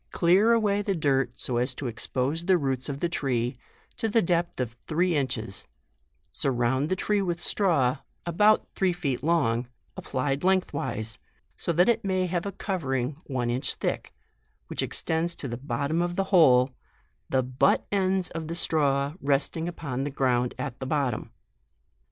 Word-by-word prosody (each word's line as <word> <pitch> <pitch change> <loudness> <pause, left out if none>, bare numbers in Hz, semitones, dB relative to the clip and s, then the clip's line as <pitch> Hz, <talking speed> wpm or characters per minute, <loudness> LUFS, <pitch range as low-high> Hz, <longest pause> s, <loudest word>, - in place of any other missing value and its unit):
141 170 0 +3 0.2
olear - - +5
away 205 -2 +1
the 200 -1 -1
dirt 135 -6 0
so 125 - -1
as 125 +2 0
to 140 - -6
expose 130 +7 -2
the 190 -1 +5
roots 135 -3 -1
of 140 0 -5
the 175 - +2
tree, 125 -6 -1 0.4
to 225 -2 0
the 225 - +3
depth 170 -2 0
of 125 -3 -1 0.2
three 175 +2 +1
inches; 115 -8 -2 0.6
surround 130 +2 0
the 185 - +1
tree 205 +2 +1
with 175 -3 -1
straw, 160 -10 +2 0.3
about 210 +6 +3
three 190 -2 +1
feet 145 -8 -2
long, 130 -8 +1 0.3
applied 135 +2 -2
lengthwise, 140 - 0 0.4
so - - -2
that 175 +2 +4
it 235 - +2
may 185 -1 +1
have 175 +1 -2
a - - -3
covering 140 - -2
one 125 -3 -1
inch 130 +2 -1
thick, - - -3 0.6
which - - -2
extends 165 +1 -1
to 140 - -6
the 120 - -4
bottom 140 +6 -1
of 175 0 -1
the 195 - +1
hole, 130 -7 +6 0.6
the 130 -1 +2
but 130 +1 +2
ends 190 -2 +1
of 165 -1 -5
the 165 - -4
straw 140 -4 +2
resting 145 +4 0
upon 140 -7 -4
the 145 - -2
ground 125 -3 +1
at 130 -4 -5
the 130 - -4
bottom. 135 -6 -1
145 Hz, 170 wpm, -27 LUFS, 130-175 Hz, 0.6 s, hole